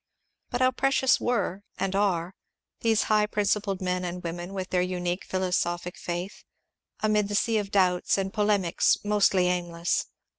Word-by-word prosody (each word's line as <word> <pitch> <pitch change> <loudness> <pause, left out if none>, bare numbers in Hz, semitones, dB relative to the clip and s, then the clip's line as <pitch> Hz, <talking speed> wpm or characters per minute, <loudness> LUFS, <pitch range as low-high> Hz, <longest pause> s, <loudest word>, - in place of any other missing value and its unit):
But 245 - -2
how 255 0 +5
precious 265 0 +2
were, 230 -5 -1 0.2
and 195 0 -1
are, 185 -3 0 0.5
these 225 -2 +2
high 210 -1 +2
principled 205 -2 0
men 180 0 -1
and 180 0 -5
women, 175 +2 -5
with 190 -2 -5
their 180 - +2
unique 180 0 -2
philosophic 180 -1 -1
faith, 175 +3 -5 0.6
amid 210 -1 +2
the 205 - -3
sea 225 +1 +2
of 200 -1 -4
doubts 185 -2 +2
and 195 0 -2
polemics 205 -5 +2
mostly 200 -3 +3
aimless 175 -1 -1
190 Hz, 150 wpm, -27 LUFS, 180-210 Hz, 0.6 s, how